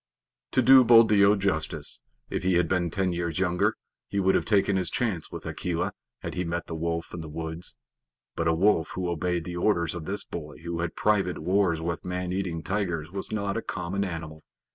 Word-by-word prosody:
To 130 - +4
do 130 +1 +8
Buldeo 110 -4 +6
justice, 95 -6 -1 0.3
if - - -3
he 95 -1 +2
had 85 -1 +3
been 90 -1 +1
ten 95 +1 0
years 85 -2 -2
younger 90 -1 +1 0.3
he 100 - -2
would 95 0 +3
have - - +1
taken 100 -2 +3
his 95 -3 0
chance 105 -10 -2
with - - -7
Akela 90 +2 -2 0.3
had - - -4
he 90 - -1
met 85 0 -3
the - - -7
wolf 85 +1 -3
in 85 - -5
the 80 - -8
woods, 80 +2 -5 0.6
but 85 - 0
a 80 - +4
wolf 90 -1 +2
who 95 -1 -2
obeyed 85 0 -1
the 90 +1 -5
orders 85 -3 +1
of 85 -3 -6
this 100 +4 -3
boy 75 -3 -7
who 85 0 -3
had 85 -1 -2
private 100 -4 +1
wars 95 -3 +1
with 85 +1 -3
man 90 0 -3
eating 90 -4 -2
tigers 90 -5 -2
was 95 0 -3
not 100 -1 -1
a - - -1
common 95 +1 -3
animal. 80 -4 -5
90 Hz, 205 wpm, -27 LUFS, 85-100 Hz, 0.6 s, do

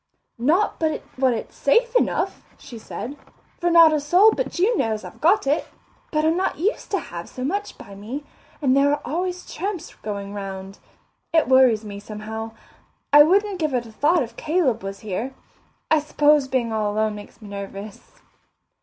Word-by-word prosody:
"Not 325 - +2
but 315 -2 -1
what 260 -1 +2
it's 225 - -7
safe 470 - +2
enough," - - +1 0.2
she 235 - -11
said, 255 +5 -7 0.4
"for 350 - +1
not 335 -2 +7
a 305 - +2
soul 360 +9 +5
but - - -3
you 410 +7 +3
knows 220 - -1
I've - - -11
got 355 +4 +4
it. 285 +3 +1 0.4
But 305 0 0
I'm 320 +1 +3
not 375 +2 -1
used 405 +9 -1
to 395 - +1
have 170 - -8
so 255 - -7
much 405 +9 -3
by 200 - -12
me, 225 +9 -6 0.4
and 260 -1 +4
there 280 +1 +4
are 290 - 0
always 360 +3 -3
tramps 365 -1 -4
going 200 -1 -6
round. 195 -1 -7 0.5
It 325 -1 +3
worries 255 -4 +5
me 200 -1 -7
somehow. 220 +2 -7 0.6
I 295 - +10
wouldn't 390 +5 +3
give 305 -5 0
it 240 -1 -1
a 225 - -12
thought 300 +7 +2
if 230 -1 -9
Caleb 305 -8 0
was 195 0 -6
here. 220 +6 -4 0.6
I 315 - +6
s'pose 295 -1 +3
being 245 -4 -1
all 210 -1 0
alone 215 +1 0
makes 205 0 -11
me 210 -3 -11
nervous." 200 +1 -9
270 Hz, 180 wpm, -23 LUFS, 215-330 Hz, 0.6 s, I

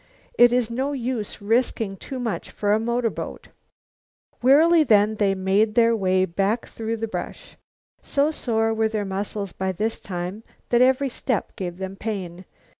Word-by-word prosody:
It 240 0 +6
is 245 -2 +1
no 265 +4 -1
use 235 -5 -4
risking 225 -2 0
too 260 +7 -7
much 235 -4 -3
for 205 0 0
a 215 - +3
motorboat." 235 0 -3 0.9
Wearily 315 +6 +6
then 215 -4 +3
they 200 -2 +2
made 195 +3 +1
their 230 -1 +4
way 185 -2 +2
back 195 +6 -1
through 225 0 -4
the 225 +1 -3
brush. 220 - -7 0.5
So 290 +2 +1
sore 225 -6 0
were 220 0 +1
their 215 -2 -2
muscles 200 0 -4
by 190 0 -2
this 220 +5 -2
time 180 +3 -5 0.3
that 240 0 +3
every 265 +2 +3
step 245 -3 -3
gave 175 -2 -5
them 190 0 -5
pain. 190 -4 -5
220 Hz, 160 wpm, -23 LUFS, 195-240 Hz, 0.9 s, It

